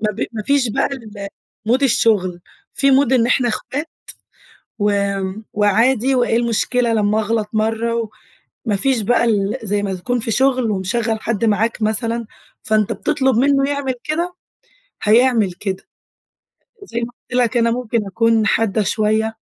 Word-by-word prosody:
ما 215 Hz, -1 st, 0 dB
ب -, -, -3 dB
ما 215 Hz, -2 st, -4 dB
فيش 280 Hz, -1 st, +2 dB
بقى 275 Hz, +6 st, 0 dB
الmood 220 Hz, +1 st, -5 dB
الشغل، 205 Hz, -8 st, +2 dB, 0.3 s
في 275 Hz, 0 st, +2 dB
mood 265 Hz, -1 st, +3 dB
إن 235 Hz, -3 st, +4 dB
إحنا 245 Hz, 0 st, +2 dB
إخوات 285 Hz, +7 st, -4 dB, 0.9 s
وآمم، 200 Hz, 0 st, -1 dB
وعادي 230 Hz, +5 st, +2 dB
وإيه 240 Hz, -2 st, +2 dB
المشكلة 235 Hz, +1 st, +1 dB
لمّا 210 Hz, 0 st, +2 dB
أغلط 215 Hz, -1 st, -1 dB
مَرّة؟ 225 Hz, +1 st, -1 dB, 0.6 s
وما 210 Hz, -, +2 dB
فيش 260 Hz, +1 st, +1 dB
بقى 235 Hz, +3 st, +2 dB
ال 205 Hz, -3 st, 0 dB
زي 205 Hz, -1 st, -1 dB
ما 195 Hz, -2 st, -2 dB
تكون 245 Hz, +7 st, -2 dB
في 225 Hz, 0 st, -3 dB
شغل 255 Hz, -2 st, +2 dB
ومشغّل 220 Hz, +4 st, -1 dB
حد 230 Hz, -1 st, -1 dB
معاك 225 Hz, +1 st, 0 dB
مثلًا، 230 Hz, +2 st, 0 dB, 0.4 s
فأنت 215 Hz, -2 st, +1 dB
بتطلب 265 Hz, -5 st, 0 dB
منه 275 Hz, +1 st, +3 dB
يعمل 280 Hz, -2 st, -1 dB
كده، 340 Hz, +4 st, -2 dB, 0.7 s
هيعمل 225 Hz, -3 st, +3 dB
كده. 190 Hz, 0 st, -5 dB, 1.0 s
زي 235 Hz, -11 st, -4 dB
ما 235 Hz, +1 st, -5 dB, 0.2 s
قُلت 250 Hz, 0 st, +1 dB
لك 245 Hz, +1 st, +1 dB
أنا 230 Hz, 0 st, +3 dB
ممكن 230 Hz, -3 st, -1 dB
أكون 225 Hz, +2 st, +2 dB
حادة 220 Hz, -1 st, +1 dB
شوية. 215 Hz, +2 st, 0 dB
225 Hz, 150 wpm, -19 LUFS, 210-250 Hz, 1.0 s, إن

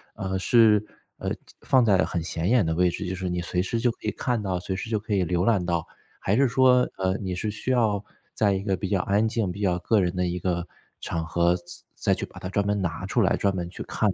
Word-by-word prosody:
呃， 95 Hz, 0 st, -2 dB
是， 105 Hz, 0 st, +5 dB, 0.3 s
呃 -, -, -3 dB, 0.3 s
放 130 Hz, -2 st, +3 dB
在 100 Hz, -5 st, +4 dB
很 85 Hz, -, -3 dB
显 85 Hz, +3 st, -2 dB
眼 120 Hz, -6 st, +4 dB
的 80 Hz, -, 0 dB
位 90 Hz, +2 st, +3 dB
置， 85 Hz, -, -4 dB
就 95 Hz, -, -3 dB
是 95 Hz, 0 st, -4 dB
你 90 Hz, 0 st, -1 dB
随 90 Hz, 0 st, -1 dB
时 115 Hz, +5 st, -2 dB
就 120 Hz, -, +3 dB
可 -, -, -16 dB
以 -, -, +1 dB
看 120 Hz, -3 st, -1 dB
到， 95 Hz, -3 st, -1 dB
随 95 Hz, -, -3 dB
时 95 Hz, +4 st, -5 dB
就 110 Hz, -, +1 dB
可 105 Hz, +1 st, -4 dB
以 95 Hz, -3 st, +2 dB
浏 90 Hz, +1 st, 0 dB
览 100 Hz, -6 st, +2 dB
到， 85 Hz, -2 st, -1 dB, 0.4 s
还 105 Hz, +4 st, +1 dB
是 140 Hz, -, +4 dB
说， 125 Hz, 0 st, +4 dB
呃， 95 Hz, +1 st, +1 dB
你 95 Hz, -3 st, -4 dB
是 105 Hz, +4 st, -2 dB
需 110 Hz, +5 st, -3 dB
要 110 Hz, -5 st, +2 dB, 0.3 s
在 105 Hz, -2 st, +2 dB
一 95 Hz, 0 st, -2 dB
个 95 Hz, -2 st, 0 dB
比 95 Hz, -, -3 dB
较 95 Hz, -1 st, +1 dB
安 105 Hz, +4 st, +2 dB
静 110 Hz, -4 st, -1 dB
比 95 Hz, -, -8 dB
较 95 Hz, -4 st, +1 dB
个 105 Hz, +4 st, +2 dB
人 90 Hz, -1 st, 0 dB
的 90 Hz, 0 st, 0 dB
一 90 Hz, 0 st, -2 dB
个 85 Hz, -1 st, -1 dB, 0.4 s
场 80 Hz, -1 st, -3 dB
合， 85 Hz, +2 st, +2 dB
再 85 Hz, -, -16 dB, 0.3 s
再 -, -, +1 dB
去 -, -, -4 dB
把 -, -, -13 dB
它 -, -, -5 dB
专 100 Hz, +2 st, 0 dB
门 100 Hz, -1 st, 0 dB
拿 85 Hz, -4 st, -3 dB
出 -, -, +1 dB
来， -, -, +3 dB
专 100 Hz, -, +1 dB
门 90 Hz, -2 st, -3 dB
去 -, -, -7 dB
看 110 Hz, -, 0 dB
95 Hz, 285 characters per minute, -25 LUFS, 90-110 Hz, 0.4 s, 是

